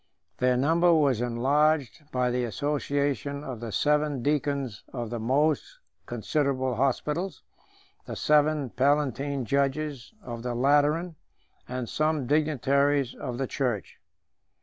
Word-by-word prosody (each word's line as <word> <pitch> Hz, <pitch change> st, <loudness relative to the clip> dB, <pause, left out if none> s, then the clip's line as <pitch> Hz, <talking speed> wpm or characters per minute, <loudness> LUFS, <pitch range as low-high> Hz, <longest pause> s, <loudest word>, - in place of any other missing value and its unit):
Their 125 Hz, 0 st, +3 dB
number 165 Hz, +6 st, +3 dB
was 140 Hz, -8 st, +3 dB
enlarged 140 Hz, +3 st, +1 dB
by 125 Hz, -1 st, +1 dB
the 125 Hz, 0 st, 0 dB
association 140 Hz, +2 st, -1 dB
of 130 Hz, -5 st, -6 dB
the 115 Hz, -1 st, -6 dB
seven 150 Hz, 0 st, +1 dB
deacons 140 Hz, -5 st, -1 dB
of 120 Hz, -3 st, -5 dB
the 120 Hz, -, -3 dB
most 145 Hz, -, +1 dB, 0.3 s
considerable 135 Hz, -4 st, -1 dB
hospitals, 150 Hz, -, -1 dB, 0.6 s
the -, -, -5 dB
seven 150 Hz, -3 st, +2 dB
palatine 140 Hz, -1 st, +1 dB
judges 140 Hz, -, -1 dB
of 120 Hz, -2 st, -6 dB
the 120 Hz, 0 st, -3 dB
Lateran, 145 Hz, +6 st, +2 dB, 0.5 s
and 125 Hz, -1 st, -4 dB
some 155 Hz, -1 st, 0 dB
dignitaries 140 Hz, -2 st, +2 dB
of 125 Hz, -3 st, -5 dB
the 135 Hz, -, -1 dB
church. 125 Hz, -7 st, -3 dB
140 Hz, 120 wpm, -27 LUFS, 125-150 Hz, 0.6 s, Their